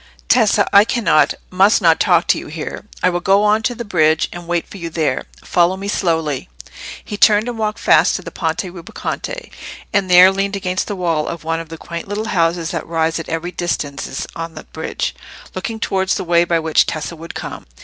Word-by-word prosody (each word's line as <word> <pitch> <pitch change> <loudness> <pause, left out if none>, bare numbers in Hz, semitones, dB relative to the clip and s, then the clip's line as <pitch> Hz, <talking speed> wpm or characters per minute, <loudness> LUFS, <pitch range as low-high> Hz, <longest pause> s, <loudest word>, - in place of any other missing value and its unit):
"Tessa, 225 -5 +4
I 200 0 +8
cannot—must 200 -2 +2
not 165 -5 +4
talk 175 -2 +3
to - - +3
you - - -9
here. 155 +6 -6 0.2
I 180 - +4
will 175 - -1
go 195 +3 +3
on 210 +1 +3
to 245 +2 -1
the 235 - -6
bridge 160 -5 +2
and 175 -1 -9
wait 175 -1 -1
for - - -11
you 170 -3 -5
there. 160 -2 -1 0.2
Follow 175 +2 +2
me 195 +1 -6
slowly." 160 - -1 0.6
He 205 - -5
turned 210 +2 +5
and 245 - -3
walked 215 -1 -2
fast - - +4
to - - -4
the - - -8
Ponte 165 +1 -2
Rubaconte, 185 - -6 0.4
and 195 -2 +1
there 180 +1 +8
leaned 195 +1 -1
against 185 -1 -2
the 205 - -3
wall 165 -4 -1
of 170 - -5
one 165 0 -1
of 165 -1 -8
the 165 - -8
quaint 170 +2 -7
little 210 +2 -3
houses 165 -1 +1
that 170 - -4
rise 165 0 0
at 165 - -7
even 165 +2 -3
distances 155 -6 -3
on 165 0 -6
the - - -8
bridge, - - -4 0.4
looking 225 -1 -4
towards 190 -2 0
the - - -3
way 170 -1 +3
by 170 -1 +1
which 160 -1 +2
Tessa 160 +1 -4
would 165 +1 -10
come. - - -7
175 Hz, 210 wpm, -18 LUFS, 165-200 Hz, 0.6 s, I